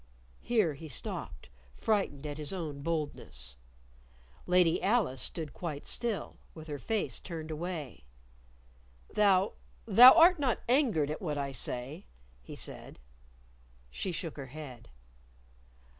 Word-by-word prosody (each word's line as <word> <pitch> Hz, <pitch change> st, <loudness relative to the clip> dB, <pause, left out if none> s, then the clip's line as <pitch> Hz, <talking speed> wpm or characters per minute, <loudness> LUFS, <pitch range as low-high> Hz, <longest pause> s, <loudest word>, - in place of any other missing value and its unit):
Here 215 Hz, -10 st, +2 dB
he 155 Hz, +3 st, -10 dB
stopped, 120 Hz, -, -5 dB, 0.3 s
frightened 195 Hz, -10 st, -1 dB
at 145 Hz, 0 st, -5 dB
his 150 Hz, -1 st, -3 dB
own 155 Hz, -7 st, -5 dB
boldness. 145 Hz, -, -4 dB, 0.9 s
Lady 180 Hz, -2 st, +4 dB
Alice 195 Hz, -, +1 dB
stood 160 Hz, -3 st, -2 dB
quite 155 Hz, -5 st, -5 dB
still, 230 Hz, -4 st, -3 dB, 0.2 s
with 160 Hz, -1 st, -9 dB
her 145 Hz, -1 st, -4 dB
face 205 Hz, -, -1 dB
turned 160 Hz, -3 st, -7 dB
away. 155 Hz, -, -5 dB, 1.1 s
"Thou 200 Hz, -2 st, +3 dB, 0.3 s
thou 240 Hz, +5 st, +10 dB
art 345 Hz, +1 st, +6 dB
not 260 Hz, -5 st, 0 dB
angered 230 Hz, -, +2 dB
at 155 Hz, -, -5 dB
what 150 Hz, -6 st, -2 dB
I 140 Hz, -1 st, -2 dB
say?" 130 Hz, -, -6 dB, 0.3 s
he -, -, -10 dB
said. -, -, -2 dB, 0.9 s
She 185 Hz, -, -2 dB
shook 165 Hz, -2 st, -4 dB
her 135 Hz, -2 st, -6 dB
head. 130 Hz, -, -10 dB
160 Hz, 125 wpm, -31 LUFS, 145-200 Hz, 1.1 s, thou